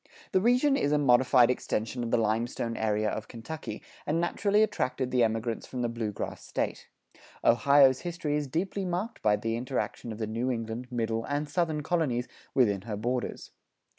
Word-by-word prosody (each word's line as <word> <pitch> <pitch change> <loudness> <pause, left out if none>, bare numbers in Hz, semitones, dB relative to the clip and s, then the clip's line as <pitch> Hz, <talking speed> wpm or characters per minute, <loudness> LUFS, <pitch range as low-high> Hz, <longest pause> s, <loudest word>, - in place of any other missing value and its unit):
The 185 - +3
region 250 +6 +4
is 195 - +1
a 150 - +4
modified 125 -2 +5
extension 120 0 -2
of 115 - -3
the 120 - +3
limestone 115 +1 -1
area 110 -1 0
of 110 +1 -3
Kentucky, 130 +7 -7 0.2
and 155 +3 +1
naturally 200 +5 +2
attracted 130 -10 -1
the 125 -2 +3
emigrants 115 0 -1
from 125 -1 -4
the 120 - 0
Blue 115 -2 -3
Grass - - -6
State. - - -3 0.6
Ohio's 135 +2 +5
history 165 -4 -2
is 150 -1 -1
deeply 190 +7 -2
marked 185 +5 -3
by 105 -2 +4
the 115 +2 -2
interaction 125 -1 -3
of 110 - -6
the 110 - -2
New 115 +4 -2
England, 115 0 -3
Middle, 115 -1 -1
and 145 +1 -2
Southern 155 -1 0
colonies 145 -8 0 0.3
within 105 -8 +3
her 105 0 -5
borders. 120 +3 -3
125 Hz, 175 wpm, -29 LUFS, 115-150 Hz, 0.6 s, modified